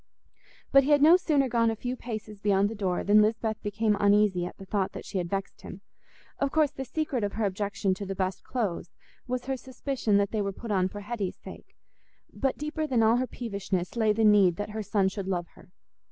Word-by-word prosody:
But 275 0 +7
he 275 - -2
had 290 -1 +5
no 325 +3 +8
sooner 300 -7 +2
gone 230 -2 +2
a 225 - -1
few 245 +3 -4
paces 215 -4 -7
beyond 200 0 +2
the - - -5
door 190 -4 -1
than 210 +1 +5
Lisbeth 220 0 0
became 210 +1 0
uneasy 200 -3 +3
at - - -11
the 195 - -10
thought 195 -1 -1
that - - -8
she 190 - -3
had 175 -1 -3
vexed 195 +1 -4
him. - - -10 0.6
Of 280 -1 0
course, 305 -2 +2
the 270 -2 -6
secret 265 -3 -2
of 200 - -2
her 220 -1 -1
objection 200 0 -1
to 200 +2 -6
the 195 - -4
best 185 0 -2
clothes 205 -9 -3 0.4
was 250 0 -3
her 265 0 -2
suspicion 255 -4 -1
that 200 -1 +1
they 215 - -1
were 200 -1 -2
put 230 +3 -7
on 185 -2 +2
for 205 +2 -8
Hetty's 205 -3 -4
sake; - - -12 0.6
but 270 -1 -1
deeper 305 +1 -3
than 245 -5 +2
all 225 +2 +4
her 255 +1 0
peevishness 200 -7 -4
lay 220 -2 +3
the 220 +1 +2
need 200 -4 +5
that 205 +2 -5
her 220 +1 -4
son 205 -1 +1
should 190 0 -4
love 175 -3 -1
her. - - -19
210 Hz, 225 wpm, -28 LUFS, 195-245 Hz, 0.6 s, no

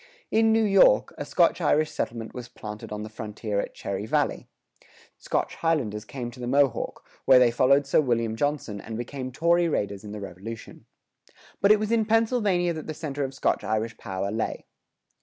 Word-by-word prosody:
In 225 0 +4
New 225 0 +4
York, 195 - +5
a - - -3
Scotch - - +2
Irish 155 0 +2
settlement 115 -1 -4
was 125 -2 -7
planted 105 0 -8
on 105 0 -4
the - - -6
frontier 110 -1 -4
at - - -4
Cherry 100 +2 -4
Valley.[104:1] - - -3 0.3
Scotch - - -2
Highlanders 120 -11 -1
came 120 0 -6
to 125 - -14
the 120 - -4
Mohawk,[104:2] 135 -2 +1 0.2
where 130 -1 +7
they 125 -2 +5
followed 135 +3 +4
Sir 140 - +3
William 115 -4 0
Johnson 130 -6 -2
and 110 0 -6
became 130 +2 -5
Tory 170 +5 +2
raiders 100 -8 -2
in 105 - -8
the 105 - -6
Revolution. 100 +4 -9 0.7
But 200 - +5
it 215 - +7
was 215 +1 -2
in 225 -2 +3
Pennsylvania 215 -6 +2
that 155 -1 -7
the 155 - -5
center 145 -2 -4
of 135 0 -4
Scotch - - 0
Irish 110 +2 -1
power 95 +1 -3
lay. 110 +1 -3
125 Hz, 185 wpm, -26 LUFS, 110-155 Hz, 0.7 s, where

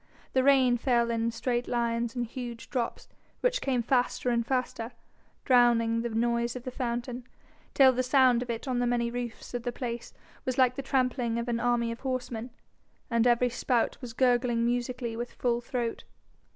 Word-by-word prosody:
The 260 - +3
rain 260 -3 +5
fell 235 -2 +2
in 230 0 0
straight 240 +1 -2
lines 235 -1 -1
and 245 -1 -1
huge 235 -1 -7
drops, 245 -4 -2 0.3
which - - +1
came 255 -3 0
faster 250 0 +1
and 235 -1 +1
faster, 245 -1 -2 0.5
drowning 235 -2 +4
the 235 - -2
noise 235 +1 0
of 250 - -6
the 255 - -5
fountain, 245 0 -4 0.5
till 265 -2 +7
the 255 - 0
sound 255 -2 +4
of 245 - -5
it 230 +4 -4
on 250 -2 0
the 245 - +1
many 235 -1 0
roofs 245 -1 -6
of 245 - -2
the 245 +1 -3
place 240 -2 -5 0.3
was 255 -1 -2
like 255 -2 +4
the 275 - -3
trampling 250 -3 0
of 235 +1 -3
an 235 -1 0
army 240 -1 +1
of 230 - -7
horsemen, 255 -3 -3 0.6
and 235 +1 +3
every 245 +1 +3
spout 240 0 0
was 245 -3 -7
gurgling 245 -1 +2
musically 245 -1 -2
with 240 +1 -5
full 240 -1 0
throat. 240 -1 -3
240 Hz, 180 wpm, -29 LUFS, 235-255 Hz, 0.6 s, till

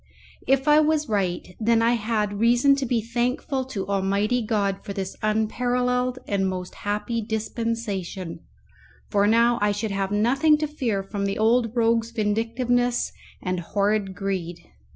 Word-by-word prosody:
If 270 +1 +2
I 300 0 +7
was 310 0 +2
right, 185 -3 -1
then 230 +1 +3
I 230 - +4
had 210 -3 -1
reason 245 +5 +4
to 270 -2 -2
be 230 -2 0
thankful 250 +4 -1
to 215 -7 -5
Almighty 200 +4 +1
God 205 -3 -1
for 200 - -5
this 195 -1 -4
unparalleled 250 +3 0
and 195 -2 0
most 180 -1 -5
happy 210 +3 -2
dispensation, 215 -5 -3 0.7
for 205 -1 +3
now 235 +2 +4
I 205 0 +3
should 205 +1 -2
have 195 -1 -1
nothing 270 +9 +3
to 305 0 -1
fear 235 -10 -2
from 200 0 -3
the 195 - -2
old 230 +1 +2
rogue's 230 0 +2
vindictiveness 235 +3 0 0.3
and 180 -1 -1
horrid 200 +2 0
greed. 180 -3 -4
220 Hz, 150 wpm, -24 LUFS, 200-245 Hz, 0.7 s, I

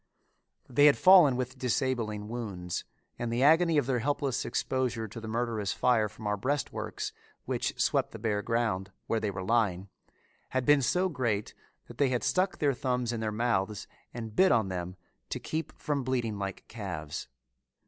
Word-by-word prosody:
They 145 +4 +5
had 145 - +5
fallen 180 -8 +7
with 125 0 -4
disabling 115 -3 -1
wounds 100 -7 -4 0.3
and 120 -1 -2
the 120 +3 +1
agony 160 +2 +5
of 145 - +3
their 130 -1 0
helpless 140 0 -1
exposure 125 -4 -1
to 115 +3 -9
the 110 - -7
murderous 110 -3 -1
fire 115 -4 +2
from 110 - -12
our 105 0 0
breastworks, 140 +8 -3 0.3
which - - -2
swept - - +2
the - - -9
bare 105 -2 -1
ground, 105 -4 -1
where 115 - 0
they 110 - -1
were 95 -1 -5
lying, 100 -3 +1 0.6
had 130 -1 -1
been 145 -1 +5
so 180 +8 +2
great 120 - -1 0.3
that - - -13
they 140 -2 +4
had 125 -2 -1
stuck 185 +1 +1
their 145 -2 +2
thumbs 125 -2 -1
in 115 - -3
their 110 -1 -1
mouths 105 -2 -1 0.2
and 115 -2 -7
bit 190 0 +5
on 110 -5 +3
them 90 0 -4 0.3
to - - -3
keep 160 -1 -4
from 145 -3 -1
bleating 120 -5 -1
like 100 -1 -5
calves. 90 -9 -5
120 Hz, 175 wpm, -30 LUFS, 105-130 Hz, 0.6 s, fallen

